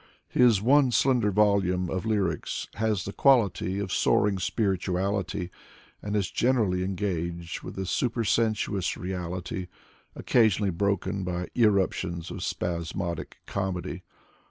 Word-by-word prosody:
His 115 -5 +4
one 135 +2 +5
slender 120 -2 +3
volume 95 -3 +2
of 95 +2 -2
lyrics 100 -7 -1
has 110 -3 -1
the 100 - -5
quality 110 -8 +3
of 100 -2 -3
soaring 100 -2 +2
spirituality, 95 -1 -1 0.5
and 105 0 -3
is 100 -4 0
generally 110 -8 +1
engaged 85 -3 -3
with - - -9
a 95 - -2
supersensuous 110 -3 0
reality, 90 +1 -4 0.5
occasionally 105 -4 +2
broken 100 +1 -1
by 90 0 -3
irruptions 95 -6 +1
of - - -6
spasmodic 85 0 -3
comedy. 95 -2 -3
95 Hz, 110 wpm, -27 LUFS, 90-105 Hz, 0.5 s, one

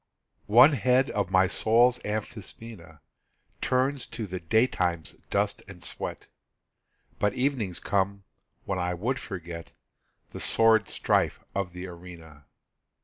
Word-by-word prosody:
One 125 +8 +7
head 130 0 +2
of 100 -4 -1
my 95 0 +4
soul's 120 +5 +3
amphisbaena 105 - -7 0.6
Turns 130 +1 0
to 110 - -5
the 95 -2 -5
daytime's 90 -4 +1 0.2
dust - - 0
and - - -12
sweat; - - -4 0.9
But 105 +4 +1
evenings 125 -9 0
come, 100 0 -1 0.4
when 95 -2 -2
I 90 0 -1
would 120 +9 -2
forget 85 -4 -8 0.6
The - - -7
sordid 110 -2 +4
strife - - +1
of 95 -3 -3
the 90 +1 -7
arena. 85 -4 -12
100 Hz, 120 wpm, -27 LUFS, 90-120 Hz, 0.9 s, One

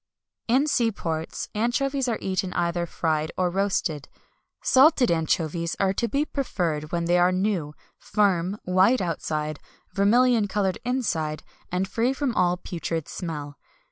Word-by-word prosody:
In 260 +5 +3
sea 235 -6 +2
ports, 160 -5 -4
anchovies 265 +5 0
are 230 - 0
eaten 185 -1 -2
either 170 0 -1
fried 155 -2 -1
or 180 -1 +1
roasted. 185 -6 -1 0.5
Salted 265 - +5
anchovies 165 0 0
are 195 -1 +2
to 235 - -1
be 280 +6 0
preferred 170 - -2
when 170 -1 -1
they 175 +1 +3
are 180 +1 +4
new, 185 -6 -1 0.2
firm, 195 -2 +1
white 190 +7 +4
outside, 155 -3 -2 0.3
vermilion 225 +2 +4
coloured 195 -1 -1
inside, 185 -12 -1 0.3
and 180 +2 0
free 235 +6 0
from 270 -3 -1
all 180 -3 +2
putrid 165 -3 -4
smell. 150 -5 -6
185 Hz, 140 wpm, -25 LUFS, 165-230 Hz, 0.5 s, Salted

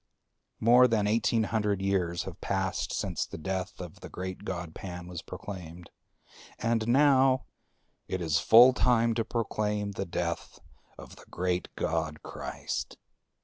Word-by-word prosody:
More 125 +3 +6
than 110 -3 +1
eighteen 115 +1 +2
hundred 105 -2 0
years 95 -3 0
have 95 -3 -9
passed 95 -1 -1
since - - -2
the - - -8
death 95 +3 -4
of 90 -3 -8
the - - -9
great 95 0 -6
god 85 -3 -5
Pan 90 -1 -7
was 90 -1 -7
proclaimed; 90 -3 -9 0.7
and 115 0 0
now 135 0 +4 0.6
it 95 - -2
is 80 -2 +1
full 120 +3 +8
time 115 -2 +3
to 115 0 0
proclaim 105 -3 -2
the 100 - -4
death 85 -1 -3 0.4
of - - -12
the - - -15
great 90 0 -1
god 80 -1 -2
Christ. - - -5
95 Hz, 145 wpm, -29 LUFS, 90-115 Hz, 0.7 s, full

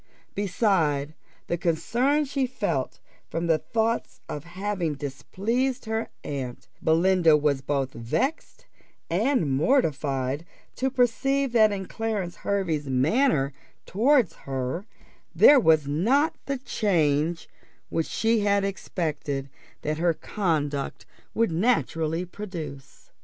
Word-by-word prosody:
Beside 175 -8 +1 0.3
the 170 - -2
concern 240 - +1
she 270 -1 -1
felt 175 - -2 0.3
from 165 +1 -2
the 165 -2 +3
thoughts 230 +1 -1
of 150 - -6
having 180 -2 -2
displeased 200 - -2
her 220 0 -2
aunt, 130 -4 -5
Belinda 165 -1 +4
was 145 -2 +1
both 135 -1 -1
vexed 160 - -2 0.5
and 215 - +2
mortified 140 - +1 0.3
to 265 - +1
perceive 265 +2 +1
that 220 -3 +5
in 195 -1 -3
Clarence 205 -5 -3
Hervey's 165 -8 -1
manner 140 - +2 0.3
towards 240 - +3
her 135 - -4 0.5
there 285 -1 +8
was 160 - +4
not 245 - +2
the 275 0 -1
change 165 - 0 0.4
which 165 - -1
she 225 0 +1
had 200 -1 +2
expected 150 -8 -3 0.3
that 155 +1 -2
her 170 -1 +2
conduct 150 -10 -2 0.3
would 230 -5 +2
naturally 165 -4 +1
produce. 160 -9 -8
175 Hz, 110 wpm, -26 LUFS, 150-225 Hz, 0.5 s, there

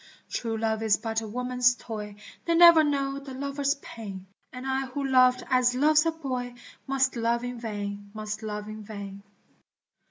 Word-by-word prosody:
True 225 -2 -2
love 220 0 -1
is 220 -2 +3
but 225 0 -2
a 220 - -6
woman's 250 +2 +1
toy, 210 -4 -7 0.3
They 335 - +2
never 340 -2 +8
know 275 -2 0
the 275 -2 -9
lover's 280 +1 -1
pain, 195 -5 -8 0.3
And 250 +1 -8
I 265 0 -1
who 275 +2 -4
loved 255 -1 +4
as 250 -1 +3
loves 300 +4 +4
a - - +3
boy 255 -6 -4 0.3
Must 270 -1 +1
love 235 +1 0
in 245 -1 -5
vain, 205 -2 -5
must 215 0 -5
love 210 -1 -5
in 215 0 -7
vain. 200 -2 -8
245 Hz, 170 wpm, -27 LUFS, 215-270 Hz, 0.3 s, never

